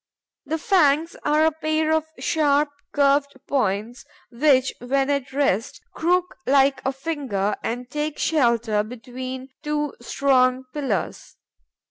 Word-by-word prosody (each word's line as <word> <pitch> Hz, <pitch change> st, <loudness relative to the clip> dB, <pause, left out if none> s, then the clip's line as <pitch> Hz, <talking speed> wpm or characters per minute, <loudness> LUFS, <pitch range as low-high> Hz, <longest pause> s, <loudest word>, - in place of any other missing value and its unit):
The 320 Hz, +3 st, -1 dB
fangs 320 Hz, -3 st, +2 dB
are 305 Hz, +1 st, +3 dB
a 320 Hz, -, +4 dB
pair 310 Hz, 0 st, 0 dB
of 315 Hz, -1 st, +1 dB
sharp, 295 Hz, -1 st, +2 dB, 0.2 s
curved 280 Hz, -1 st, +2 dB
points, 230 Hz, -2 st, -1 dB, 0.3 s
which, 260 Hz, +1 st, +3 dB
when 270 Hz, +3 st, 0 dB
at 280 Hz, -2 st, -2 dB
rest, 265 Hz, -5 st, 0 dB
crook 360 Hz, +2 st, 0 dB
like 270 Hz, -1 st, +4 dB
a 265 Hz, -, 0 dB
finger 270 Hz, -9 st, -2 dB
and 245 Hz, +2 st, -4 dB
take 300 Hz, +3 st, -3 dB
shelter 235 Hz, -8 st, +2 dB
between 255 Hz, +3 st, -7 dB
two 295 Hz, -1 st, -2 dB
strong 255 Hz, 0 st, +2 dB
pillars. 255 Hz, -, -3 dB
275 Hz, 120 wpm, -23 LUFS, 250-300 Hz, 0.3 s, a